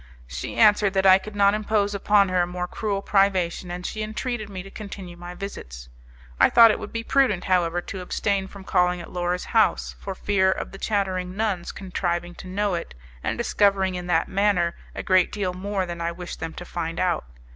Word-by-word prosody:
She 65 Hz, +3 st, -6 dB
answered 210 Hz, -2 st, +5 dB
that 190 Hz, 0 st, +2 dB
I 190 Hz, 0 st, +8 dB
could 210 Hz, +2 st, -10 dB
not 200 Hz, 0 st, +4 dB
impose 210 Hz, -1 st, 0 dB
upon 200 Hz, 0 st, +3 dB
her 185 Hz, -1 st, +2 dB
a 175 Hz, -, 0 dB
more 180 Hz, 0 st, -4 dB
cruel 200 Hz, 0 st, -3 dB
privation, 190 Hz, -3 st, +1 dB
and 175 Hz, 0 st, -6 dB
she 215 Hz, -, -4 dB
entreated 215 Hz, 0 st, -3 dB
me 185 Hz, -2 st, -6 dB
to 195 Hz, -, -12 dB
continue 195 Hz, -4 st, -8 dB
my 175 Hz, +1 st, -9 dB
visits. 65 Hz, -, -8 dB, 0.5 s
I -, -, +6 dB
thought 230 Hz, -1 st, +8 dB
it -, -, -2 dB
would -, -, -7 dB
be 230 Hz, 0 st, -3 dB
prudent, 245 Hz, -9 st, +2 dB
however, 175 Hz, -2 st, +1 dB
to 190 Hz, +1 st, -7 dB
abstain 195 Hz, +1 st, -1 dB
from 195 Hz, 0 st, -11 dB
calling 180 Hz, -1 st, +2 dB
at 170 Hz, -, -9 dB
Laura's 180 Hz, 0 st, -1 dB
house, 225 Hz, -2 st, +2 dB
for 195 Hz, -, -6 dB
fear 190 Hz, -2 st, +2 dB
of -, -, -4 dB
the 195 Hz, -, -10 dB
chattering 185 Hz, -3 st, -1 dB
nuns 205 Hz, -5 st, -1 dB
contriving 175 Hz, -2 st, -3 dB
to -, -, -11 dB
know 200 Hz, +1 st, -1 dB
it, 170 Hz, -, -4 dB, 0.3 s
and -, -, -1 dB
discovering 200 Hz, -5 st, +2 dB
in 180 Hz, -1 st, -5 dB
that 165 Hz, -2 st, +2 dB
manner 190 Hz, -4 st, +1 dB, 0.2 s
a -, -, -4 dB
great 185 Hz, -1 st, +3 dB
deal 195 Hz, -4 st, -2 dB
more 195 Hz, +1 st, -2 dB
than 170 Hz, -1 st, -6 dB
I 170 Hz, 0 st, -1 dB
wished 175 Hz, +1 st, -8 dB
them 160 Hz, 0 st, -5 dB
to 175 Hz, -, -8 dB
find 165 Hz, -1 st, -4 dB
out. 180 Hz, -2 st, 0 dB
190 Hz, 210 wpm, -24 LUFS, 175-205 Hz, 0.5 s, I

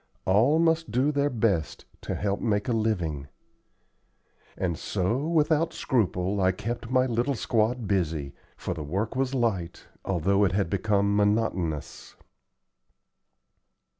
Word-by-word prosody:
All 110 Hz, +11 st, +4 dB
must 165 Hz, 0 st, +2 dB
do 130 Hz, +5 st, +2 dB
their 145 Hz, 0 st, +1 dB
best 105 Hz, -, -1 dB, 0.2 s
to -, -, -4 dB
help 100 Hz, 0 st, -1 dB
make 105 Hz, -1 st, 0 dB
a -, -, 0 dB
living;" 90 Hz, -11 st, -1 dB, 1.3 s
and 90 Hz, -3 st, -1 dB
so 95 Hz, +7 st, -1 dB
without 160 Hz, 0 st, +2 dB
scruple 100 Hz, -5 st, 0 dB
I 95 Hz, 0 st, +4 dB
kept 115 Hz, +4 st, -5 dB
my 130 Hz, 0 st, +3 dB
little 125 Hz, +3 st, 0 dB
squad 115 Hz, 0 st, 0 dB
busy, 80 Hz, -8 st, -1 dB, 0.2 s
for -, -, -3 dB
the 80 Hz, -, -6 dB
work 95 Hz, -, -3 dB
was 135 Hz, 0 st, 0 dB
light, 100 Hz, -9 st, -1 dB, 0.2 s
although 95 Hz, +2 st, +1 dB
it 95 Hz, -3 st, +2 dB
had 100 Hz, -3 st, 0 dB
become 100 Hz, 0 st, +1 dB
monotonous. 100 Hz, -7 st, -1 dB
105 Hz, 130 wpm, -27 LUFS, 90-125 Hz, 1.3 s, All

